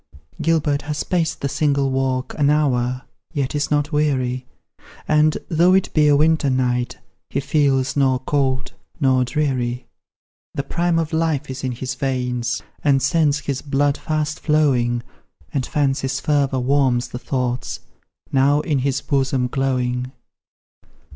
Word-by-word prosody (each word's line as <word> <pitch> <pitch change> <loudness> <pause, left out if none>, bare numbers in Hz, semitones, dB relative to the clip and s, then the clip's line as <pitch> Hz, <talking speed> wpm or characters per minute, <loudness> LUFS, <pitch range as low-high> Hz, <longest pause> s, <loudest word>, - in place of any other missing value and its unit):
Gilbert 155 -3 +1
has 150 0 -3
paced 165 -3 -1
the 140 - 0
single 140 -1 +1
walk 130 -1 -1
An 145 -1 +4
hour, 130 -4 +1 0.3
yet 140 -3 -1
is 145 0 -1
not 145 0 +1
weary; 130 -4 0 0.6
And, 155 0 +3
though 175 +3 +4
it 190 - +1
be 150 -1 +4
a 145 - +5
winter 155 -1 +3
night 125 -1 0 0.3
He 140 - -1
feels 140 -2 +1
nor 135 -2 +3
cold 135 0 -1 0.3
nor 130 -3 +3
dreary. 125 -2 -1 0.7
The 140 - -1
prime 170 +3 0
of 165 0 -1
life 160 -4 0
is 130 +1 -7
in 130 -1 -1
his 130 +2 -4
veins, 125 -2 -2 0.2
And 140 -2 +4
sends 150 +1 +2
his 140 -2 -3
blood 140 0 +1
fast 155 -1 -2
flowing, 125 -6 +2 0.5
And 130 -3 -1
Fancy's 135 -3 0
fervour 140 -2 +1
warms 130 -2 +2
the 125 - -6
thoughts 125 -2 -3 0.5
Now 140 +2 +3
in 150 -4 0
his 135 +1 0
bosom 135 -2 0
glowing. 125 -1 -1
140 Hz, 140 wpm, -21 LUFS, 130-150 Hz, 0.7 s, a